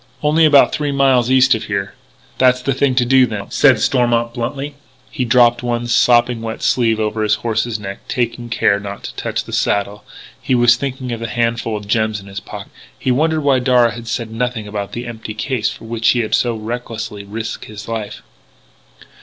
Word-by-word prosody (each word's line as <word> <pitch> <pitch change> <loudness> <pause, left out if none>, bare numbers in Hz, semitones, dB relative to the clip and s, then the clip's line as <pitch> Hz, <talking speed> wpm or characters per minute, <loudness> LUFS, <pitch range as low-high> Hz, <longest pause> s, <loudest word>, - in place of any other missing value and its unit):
"Only 155 +2 +4
about 145 -2 +6
three 150 -1 -1
miles 135 -3 +3
east 130 0 +5
of 110 - -3
here." 100 -1 -3 0.5
"That's 125 -1 +3
the 135 - +1
thing 135 0 +1
to 125 -1 +3
do, 130 0 +5
then," 100 -3 -6
said 130 -6 +4
Stormont 120 -2 +1
bluntly. 140 +5 -4 0.4
He 125 - -2
dropped 120 0 +4
one 120 -1 -2
sopping 120 0 +3
wet 110 -1 -5
sleeve 115 -3 +2
over 110 0 -1
his 105 -1 +2
horse's 115 0 0
neck, 100 -1 -7
taking 120 -1 -2
care 100 -3 +2
not 100 0 -8
to - - -7
touch - - -3
the - - -10
saddle. 100 +1 -1 0.4
He 130 - 0
was 120 0 +5
thinking 130 -1 -4
of 115 - -4
the 115 - -4
handful 115 0 -1
of 105 -1 -9
gems 110 -1 0
in 100 - -14
his 100 0 -7
pocket; - - -10
and - - -21
he 130 - +2
wondered 155 +4 +1
why 135 -2 +3
Darragh 125 -2 +3
had 120 0 -9
said 115 0 -3
nothing 115 -2 -3
about 105 -1 -5
the 120 +1 -5
empty 110 -2 -7
case 110 0 -1
for - - -10
which 115 0 0
he 120 - +3
had 110 - -4
so 120 -2 +2
recklessly 110 -2 -5
risked 110 +3 -6
his 105 0 -10
life. 110 -3 -5
120 Hz, 205 wpm, -18 LUFS, 110-125 Hz, 0.5 s, about